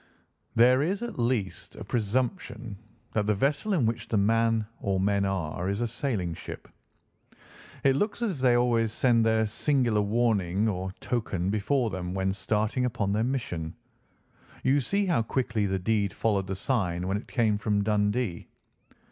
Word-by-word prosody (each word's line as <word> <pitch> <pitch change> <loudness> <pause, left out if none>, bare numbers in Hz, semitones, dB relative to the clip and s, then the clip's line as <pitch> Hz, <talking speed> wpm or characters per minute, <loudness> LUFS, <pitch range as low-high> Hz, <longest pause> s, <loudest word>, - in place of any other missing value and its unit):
"There 125 +3 +6
is 195 +9 -1
at 240 - -6
least 115 -5 -1
a - - -7
presumption 120 - -2 0.4
that 105 -1 0
the 105 - +3
vessel 145 - 0
in 155 -11 +2
which 115 +1 -2
the 110 - 0
man 115 +2 +2
or 95 -1 0
men 100 +1 +2
are 90 -2 -2
is 100 +1 -1
a - - +1
sailing 110 -8 -2
ship. - - -8 1.2
It 135 -1 +4
looks 205 +8 -1
as 225 - +1
if 170 - -5
they 125 -2 +4
always 115 -2 +2
send 120 -1 +3
their 110 0 +3
singular 120 -1 +1
warning 105 -2 +1
or 95 -2 -2
token 100 -6 -1
before 115 +3 +1
them 90 0 -4
when 95 0 0
starting 105 +5 0
upon 100 -5 -1
their 110 +2 +1
mission. 90 -11 -3 0.9
You 135 +2 +3
see 200 +9 0
how 175 -10 +2
quickly 115 -3 -1
the 95 0 0
deed 100 0 0
followed 100 -4 0
the 95 - -3
sign 90 -5 -1
when 95 +2 0
it 105 - -9
came 110 -5 +1
from 105 -1 +1
Dundee. 105 -2 0
110 Hz, 165 wpm, -28 LUFS, 100-125 Hz, 1.2 s, There